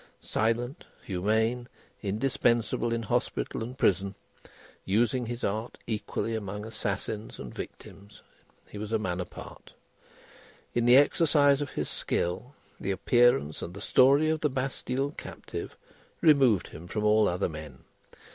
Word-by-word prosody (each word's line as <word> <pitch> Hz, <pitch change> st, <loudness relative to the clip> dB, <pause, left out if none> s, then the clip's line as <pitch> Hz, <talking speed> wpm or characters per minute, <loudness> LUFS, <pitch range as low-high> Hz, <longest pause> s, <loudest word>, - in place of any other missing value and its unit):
Silent, 120 Hz, +7 st, -1 dB, 0.2 s
humane, 110 Hz, +6 st, 0 dB, 0.3 s
indispensable 115 Hz, +1 st, +1 dB
in 115 Hz, 0 st, -1 dB
hospital 105 Hz, -, -1 dB
and 125 Hz, +3 st, -7 dB
prison, 100 Hz, -4 st, +2 dB, 0.7 s
using 120 Hz, +4 st, +1 dB
his 120 Hz, +1 st, -5 dB
art 110 Hz, +4 st, -2 dB
equally 115 Hz, 0 st, -2 dB
among 105 Hz, -1 st, -4 dB
assassins 105 Hz, 0 st, -4 dB
and -, -, -8 dB
victims, 100 Hz, +1 st, -10 dB, 0.5 s
he 105 Hz, -, -9 dB
was 105 Hz, +1 st, -5 dB
a 110 Hz, -, +3 dB
man 90 Hz, -4 st, -2 dB
apart. 90 Hz, -, -10 dB, 1.0 s
In 120 Hz, -1 st, +1 dB
the 125 Hz, +2 st, +8 dB
exercise 145 Hz, -1 st, +4 dB
of 145 Hz, -, -2 dB
his -, -, -3 dB
skill, 125 Hz, +11 st, -2 dB, 0.2 s
the 95 Hz, -, -4 dB
appearance 95 Hz, -, +3 dB
and 85 Hz, -, -6 dB
the -, -, -7 dB
story 140 Hz, +8 st, +5 dB
of 160 Hz, -, 0 dB
the 150 Hz, -, +2 dB
Bastille 130 Hz, +1 st, -2 dB
Captive -, -, -7 dB, 0.4 s
removed 135 Hz, -, +4 dB
him 85 Hz, +3 st, -10 dB
from 105 Hz, +4 st, -3 dB
all 105 Hz, 0 st, +5 dB
other 90 Hz, +2 st, 0 dB
men. 75 Hz, -5 st, -9 dB
110 Hz, 135 wpm, -28 LUFS, 100-125 Hz, 1.0 s, the